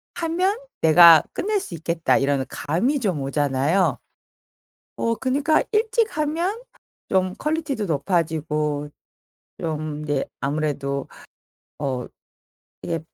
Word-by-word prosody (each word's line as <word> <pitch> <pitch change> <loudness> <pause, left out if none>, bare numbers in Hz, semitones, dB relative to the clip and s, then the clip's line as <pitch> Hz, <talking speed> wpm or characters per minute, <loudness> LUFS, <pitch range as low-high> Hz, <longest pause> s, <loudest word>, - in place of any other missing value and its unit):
하면 355 +5 0 0.2
내가 165 0 +8
끝낼 415 +1 0
수 180 - -8
있겠다.' 165 +1 +1
이런 135 -1 +1
감이 240 - 0
좀 185 - -1
오잖아요. 145 +5 +1 1.0
어 230 0 +1
그니까 275 +6 +1
일찍 445 -2 +1
하면 340 +9 -1 0.5
좀 185 -1 +1
퀄리티도 300 -8 -2
높아지고 150 -2 -1 0.7
좀 155 -2 -3
이제 145 -2 -1 0.2
아무래도 140 -1 -2 0.7
더 130 -4 -3 0.8
이게 165 - -2
170 Hz, 210 characters per minute, -23 LUFS, -, 1.0 s, 내가